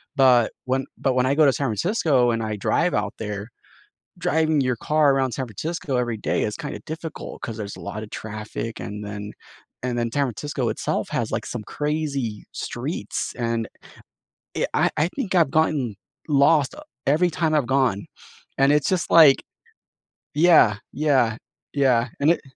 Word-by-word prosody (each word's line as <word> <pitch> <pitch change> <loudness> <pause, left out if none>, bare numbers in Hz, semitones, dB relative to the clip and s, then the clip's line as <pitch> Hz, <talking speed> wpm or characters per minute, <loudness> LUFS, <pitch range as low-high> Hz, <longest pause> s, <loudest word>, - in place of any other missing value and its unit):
but, 125 -5 +5
when 130 +1 0
but 130 - +1
when 125 0 +3
I 135 - +2
go 155 -1 +5
to 135 - +4
San 140 - -1
Francisco 130 - +2
and 115 -1 -1
I 110 -1 -2
drive 170 - +1
out 105 -1 -1
there, 105 -1 -4 0.7
driving 160 -2 +2
your 125 -2 0
car 150 +3 +3
around 130 -2 +1
San 130 +2 -3
Francisco 140 - -3
every 120 -2 -1
day - - 0
is 105 - -2
kinda 145 - -6
difficult 160 0 -7
'cause 115 -2 -5
there's 100 -2 -5
a - - -10
lot 105 +2 -5
of - - -11
traffic, 110 +1 -6
and 105 0 -6
then 105 0 -6 0.5
and 125 -1 -2
then 115 -1 -1
San 140 +2 +2
Francisco 135 +1 -3
itself - - -2
has - - -1
like - - -1
some - - -5
crazy 145 -8 -2
streets, - - -4
and 115 -1 -1 1.1
i - - +3
I 155 +3 +2
think 200 -8 -2
I've 165 -6 +4
gotten 145 -9 +1 0.3
lost 140 0 +4 0.3
every 160 +6 +3
time 165 -2 0
I've 145 -5 +1
gone, 130 -7 +1 0.5
and 135 +1 +4
it's 150 -2 +2
just 185 -2 -1
like 155 -5 +7 0.9
yeah, 155 -10 +6 0.2
yeah, 135 -6 +2 0.4
yeah, 125 -4 +3
and 145 +3 +3
it - - 0
130 Hz, 170 wpm, -23 LUFS, 115-150 Hz, 1.1 s, like